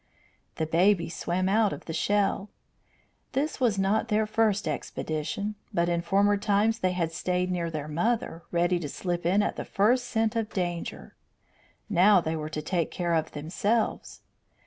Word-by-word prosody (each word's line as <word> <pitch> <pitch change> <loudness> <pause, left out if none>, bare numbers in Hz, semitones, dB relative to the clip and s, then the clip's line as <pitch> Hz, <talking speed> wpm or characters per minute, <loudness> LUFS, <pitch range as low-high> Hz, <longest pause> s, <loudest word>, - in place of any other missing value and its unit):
The 160 - -1
babies 170 +1 +2
swam 185 +2 -1
out 210 +1 +3
of - - -7
the 160 - -5
shell. 200 +3 +1 0.8
This 290 +2 -1
was 235 -6 +2
not 195 +3 +1
their 215 -1 +2
first 215 -3 +1
expedition, 155 +6 -3 0.2
but 170 0 +1
in 170 -1 +1
former 200 +4 +3
times 210 +3 +1
they 185 -3 +1
had 170 -3 -1
stayed 180 +2 -1
near 170 -2 -1
their 155 -2 -4
mother, 170 +2 -1
ready 175 +1 +2
to 150 -4 -5
slip 175 +2 -2
in 200 +4 +3
at - - -2
the - - -3
first 245 +5 +2
scent 225 -2 0
of 225 -2 -1
danger. 175 -3 -4 0.7
Now 200 0 +5
they 160 -1 -2
were 155 -1 -4
to 155 -1 -4
take 170 0 0
care 175 -1 -2
of 160 -1 0
themselves. 190 +9 -1
185 Hz, 170 wpm, -27 LUFS, 170-210 Hz, 0.8 s, Now